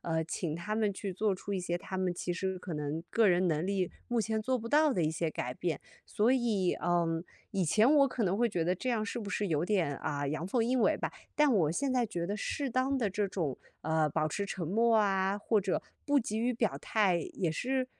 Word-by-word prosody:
呃， 160 -1 -1
请 165 -1 -3
他 210 +5 -3
们 215 -2 +1
去 195 0 -5
做 205 +2 +1
出 200 +2 -6
一 190 - -1
些 175 -1 -1
他 190 +1 -6
们 185 -1 0
其 175 0 -3
实 190 +1 -2
可 180 -2 -7
能 150 +2 -3
个 225 -2 +4
人 180 0 +3
能 155 -1 +1
力， 190 -2 -1 0.2
目 240 -1 +1
前 220 0 -1
做 255 +2 0
不 230 - -7
到 300 +1 +4
的 180 - 0
一 155 - +1
些 160 0 -1
改 125 -4 -4
变。 170 +2 -2 0.3
所 225 +5 +2
以， 220 -8 +1
嗯， 170 -1 +1 0.3
以 195 -3 +1
前 215 +8 +4
我 275 -2 +6
可 235 -4 -1
能 190 +2 +1
会 240 +1 +2
觉 175 -5 -1
得 180 +2 +2
这 255 - -4
样 225 -3 0
是 235 +3 -4
不 205 - -6
是 205 - -1
有 155 -2 +1
点， 180 -8 +1
啊， 145 -1 -2
阳 155 +4 -2
奉 230 +3 +1
阴 250 +2 +1
违 - - +3
吧， - - -3 0.2
但 300 -2 +5
我 160 -7 +3
现 270 +10 0
在 250 -2 +2
觉 175 -6 -3
得 205 +3 -2
适 280 +4 -2
当 260 +2 +1
的 220 -5 +1
这 200 +1 -1
种， 160 -9 -2 0.3
呃， 160 -1 +2
保 155 +1 +1
持 200 +6 -2
沉 190 -4 -4
默 225 +6 +3
啊， 195 -1 +1
或 210 0 +2
者 190 -1 0 0.2
不 285 -1 +3
急 220 -2 -2
于 245 +2 +1
表 225 -2 0
态， 195 -6 +2 0.2
也 175 -4 0
是 255 +7 -1
195 Hz, 265 characters per minute, -31 LUFS, 170-230 Hz, 0.3 s, 我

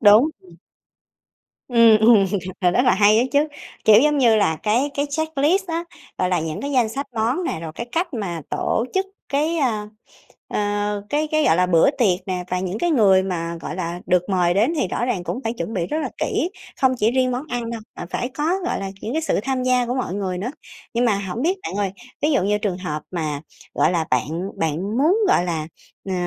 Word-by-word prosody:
Đúng, 215 +8 +7
ừm. 175 -2 -18 1.1
Ừm, 230 -3 +6
ừm, 220 -2 +6 0.4
ờ, 180 -2 +4
rất 245 +8 +2
là 250 - +4
hay 210 +2 +5
á 240 - +3
chứ. 290 +2 +3 0.4
Kiểu, 215 0 +8
giống 295 +1 +3
như 235 -4 +5
là, 160 -7 +2
cái 240 +7 +1
cái 285 +1 0
checklist 315 +5 +1
á, 335 0 -2 0.3
gọi 185 - +1
là, 180 -2 +1
những 155 -1 -4
cái 280 - -4
danh 245 -4 +3
sách 275 +5 -4
món 235 +10 0
nè, 160 - -2
rồi 160 -1 -6
cái 235 - -5
cách 335 0 -1
mà 185 -7 -3
tổ 225 - 0
chức 385 0 +1 0.2
cái, 305 +4 0
ơ, 220 -7 0 0.6
ơ, 205 0 -1
cái 300 +1 0
cái, 310 0 +2
gọi 160 - +4
là, 180 +1 +3
bữa 175 +7 +4
tiệc 200 -10 +2
nè 180 -1 -2
và 180 - 0
những 185 +2 -3
cái 345 +7 0
người 195 -9 +5
mà, 170 -3 -3
gọi - - -5
là, 175 -1 -4
được 180 +1 +1
mời 180 -2 +2
đến 220 - +2
thì 290 - 0
rõ 235 - -2
ràng 230 -8 -1
cũng 235 - -3
phải 225 - -1
chuẩn 225 -1 -5
bị 175 -4 -1
rất 305 - -2
là - - -2
kỹ, 345 - -1 0.3
không 260 - +5
chỉ 220 0 +2
riêng 255 0 +2
món 250 +3 -2
ăn 240 -3 -3
đâu 230 -1 -5
mà - - -6
phải 245 - -2
có, 295 - -3 0.2
gọi - - -1
là, 195 - -4
những 230 - -4
cái 320 - 0
sự 320 - 0
tham 260 0 -1
gia 250 -1 +2
của 245 +1 -2
mọi 255 -8 -2
người 190 -2 -2
nữa. 215 +8 -3 0.4
Nhưng 240 +1 +2
mà 220 -4 +3
hổng 200 +4 -4
biết 360 +7 +1
bạn - - -4
ơi, 200 -2 -1 0.3
ví 300 +2 +2
dụ 270 - +2
như 205 +2 +2
trường 205 -4 -2
hợp 155 -5 -4
mà, 155 -5 -3 0.3
gọi - - +2
là, 165 -3 0
bạn 155 - -1
bạn 170 +8 -1
muốn, 320 +9 +4
gọi 180 - +3
là, 160 -3 -2 0.4
ờ, - - -1
220 Hz, 235 wpm, -22 LUFS, 180-265 Hz, 1.1 s, Kiểu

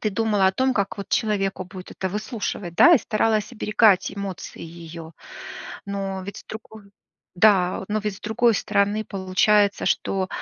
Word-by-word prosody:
ты 215 - 0
думала 210 -2 +1
о 190 - +3
том, 260 +4 +1
как 200 -1 -1
вот 200 - -6
человеку 195 -4 0
будет 185 0 -10
это 190 - -3
выслушивать, 210 -3 -4
да? 345 - +7
И 290 - +5
старалась 215 +1 0
оберегать 210 -4 +3
эмоции 200 -2 -7
её. 165 0 -10 0.7
Но 195 -1 -4
ведь 200 - -7
с - - -13
другой 220 -2 -11 0.4
да. 185 -1 +3
Но 215 +1 0
ведь 210 -2 -3
с - - -17
другой 235 +1 +2
стороны 205 +1 0
получается, 200 +1 +2
что 190 -1 0
200 Hz, 160 wpm, -23 LUFS, 190-215 Hz, 0.7 s, да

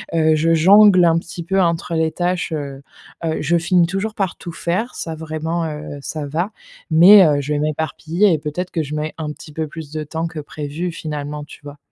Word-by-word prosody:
Heu, 160 -1 +3
je 165 +2 +2
jongle 185 +2 +6
un 165 0 +4
petit 170 0 -8
peu 190 +1 +1
entre 170 -1 0
les 160 0 +1
tâches, 180 0 -2
heu, 140 -2 -5 0.4
heu, 160 -1 -1
je 170 +4 +2
finis 175 0 +2
toujours 195 +4 -3
par 195 -3 -2
tout 170 - -8
faire, 200 +11 -2
ça 165 -1 -5
vraiment, 160 +1 -3
heu, 150 -2 -6
ça 150 +1 -5
va, 170 +8 -2 0.4
mais, 185 +5 +8
heu, 145 -2 +3
je 150 +2 -3
vais 145 - 0
m'éparpiller 160 +5 0
et - - +2
peut-être 175 +5 -4
que 160 -3 -1
je 150 +1 -5
mets 155 +1 -3
un 155 -2 -4
petit 150 - -13
peu 160 0 -3
plus 155 -3 -9
de 155 -1 -3
temps 160 +2 -3
que 160 -2 -7
prévu, 150 +4 -5
finalement, 150 -2 -5
tu - - -14
vois? 145 0 -10
160 Hz, 215 wpm, -19 LUFS, 150-175 Hz, 0.4 s, mais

